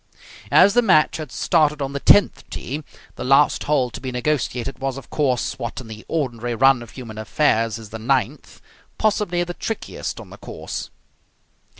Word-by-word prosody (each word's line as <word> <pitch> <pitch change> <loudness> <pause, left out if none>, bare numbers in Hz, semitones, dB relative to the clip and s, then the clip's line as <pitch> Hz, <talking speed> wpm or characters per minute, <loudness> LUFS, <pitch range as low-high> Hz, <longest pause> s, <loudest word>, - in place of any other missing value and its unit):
As 200 +2 +6
the 245 - +5
match 185 -9 +4
had 155 -2 -7
started 150 -3 +2
on 140 -1 -3
the 140 - -2
tenth 205 +7 +5
tee, 150 +4 -5 0.3
the - - -4
last 135 +3 +3
hole 135 -5 +1
to - - -8
be 130 -1 -4
negotiated 130 -1 -2
was, 135 0 -2
of 135 - -11
course, 130 -5 0
what 115 - -4
in 125 - -9
the 110 0 -9
ordinary 120 -6 -2
run 135 +1 +4
of 120 - -10
human 115 -4 -9
affairs 115 -2 +1
is 110 -2 -11
the 110 - -6
ninth, 130 +4 -1 0.4
possibly 200 -5 +1
the 175 0 -5
trickiest 225 +5 -5
on - - -11
the - - -12
course. - - -6
135 Hz, 180 wpm, -22 LUFS, 120-155 Hz, 0.4 s, As